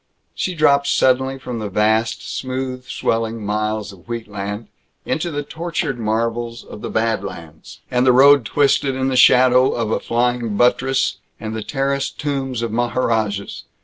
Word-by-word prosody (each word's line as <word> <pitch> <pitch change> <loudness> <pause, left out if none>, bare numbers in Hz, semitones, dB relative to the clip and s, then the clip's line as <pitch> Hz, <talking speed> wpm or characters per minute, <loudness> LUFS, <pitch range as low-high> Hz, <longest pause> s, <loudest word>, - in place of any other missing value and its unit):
She 185 - -3
dropped 140 -2 +3
suddenly 130 +1 +2
from 125 -3 -6
the 105 -2 -4
vast, 110 +3 +1
smooth 130 0 -4
swelling 115 -1 -2
miles 105 0 -2
of 95 +1 -18
wheatland 105 -2 -5 0.4
into 170 +2 -1
the 145 -2 -3
tortured 160 -4 -3
marvels 115 +1 -2
of 105 - -11
the - - -5
Bad 110 -2 0
Lands, 80 -5 -10
and 125 0 +2
the 130 - +5
road 140 +1 +6
twisted 135 +4 +1
in 130 0 0
the 130 - -1
shadow 125 +1 +5
of 115 -2 -1
flying 120 -2 0
buttresses 135 +3 +2 0.2
and 110 0 -5
the 110 - -3
terraced 140 +3 -2
tombs 135 -4 -2
of 115 - -2
maharajas. 110 -4 -1
120 Hz, 150 wpm, -20 LUFS, 110-135 Hz, 0.4 s, road